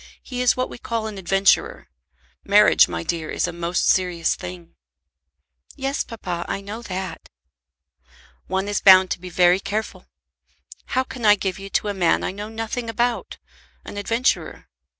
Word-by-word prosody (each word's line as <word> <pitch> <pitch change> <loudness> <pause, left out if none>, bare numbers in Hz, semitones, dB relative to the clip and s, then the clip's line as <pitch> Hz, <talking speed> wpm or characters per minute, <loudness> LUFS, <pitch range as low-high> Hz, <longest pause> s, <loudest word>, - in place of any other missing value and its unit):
He 250 -1 -5
is 250 0 +3
what 255 - 0
we - - -11
call 230 -2 -3
an 210 -3 -6
adventurer. 195 +2 +2 0.6
Marriage, 210 +1 +6
my 85 -1 -4
dear, 160 - -3
is - - -1
a 175 - -5
most 170 +1 -1
serious 180 -3 +2
thing." 90 -2 -9 1.0
"Yes, 270 +1 -2
papa, 180 -7 -5
I - - -3
know 205 +3 -7
that." 185 -5 -6 1.2
"One 190 +2 -1
is 205 -1 -1
bound 185 -1 +7
to - - -2
be 180 - -8
very 180 +1 +4
careful. 215 +2 -4 0.9
How 260 - +4
can 250 -2 -9
I 210 -1 +7
give 190 -2 -3
you 195 0 -8
to 210 - 0
a - - -1
man 180 -4 +1
I - - -2
know 205 +2 -7
nothing 225 +1 -4
about, 235 +1 -1 0.5
an - - -8
adventurer? 230 +5 -1
195 Hz, 165 wpm, -22 LUFS, 180-225 Hz, 1.2 s, bound